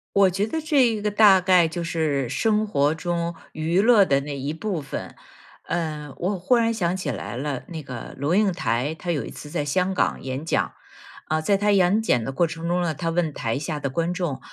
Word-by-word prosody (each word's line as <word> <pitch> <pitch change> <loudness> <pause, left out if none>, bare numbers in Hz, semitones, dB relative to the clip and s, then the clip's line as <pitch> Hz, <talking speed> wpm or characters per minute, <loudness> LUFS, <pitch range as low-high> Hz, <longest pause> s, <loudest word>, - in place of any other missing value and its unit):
我 195 -1 +6
觉 195 +4 -1
得 320 - -2
这 295 -4 +3
一 220 -3 -1
个， 210 - 0
大 205 -2 +6
概 180 -2 +5
就 170 +2 -4
是 155 -5 -1
生 210 - +1
活 145 -6 +1
中 170 0 -2 0.2
娱 165 +5 +1
乐 225 -2 +6
的 140 -5 +2
那 140 0 -5
一 140 +2 -3
部 180 0 -3
分。 140 - -7 0.5
呃， 155 -4 -3
我 185 +2 -2
忽 190 +8 +3
然 230 -1 +2
想 180 -5 0
起 165 -6 -3
来 115 0 -6
了， 135 0 -3
那 160 -3 -7
个 130 -4 -8
龙 145 +6 0
应 205 -1 +3
台， 145 -3 -1
她 175 +2 -4
有 150 -5 -1
一 - - -7
次 145 - -10
在 145 - -2
香 185 +6 0
港 - - 0
演 130 +2 -4
讲。 - - 0 0.5
啊， 155 0 0
在 200 +5 +2
她 205 +1 +2
演 195 +2 +4
讲 125 - +1
的 135 - -3
过 170 +6 +1
程 165 +1 -5
中 180 +1 +1
呢， 165 -3 -1
她 165 +4 -2
问 165 -2 0
台 115 +1 -2
下 150 0 -3
的 140 - -1
观 165 +5 -1
众， 175 -8 -3
170 Hz, 245 characters per minute, -24 LUFS, 145-190 Hz, 0.5 s, 我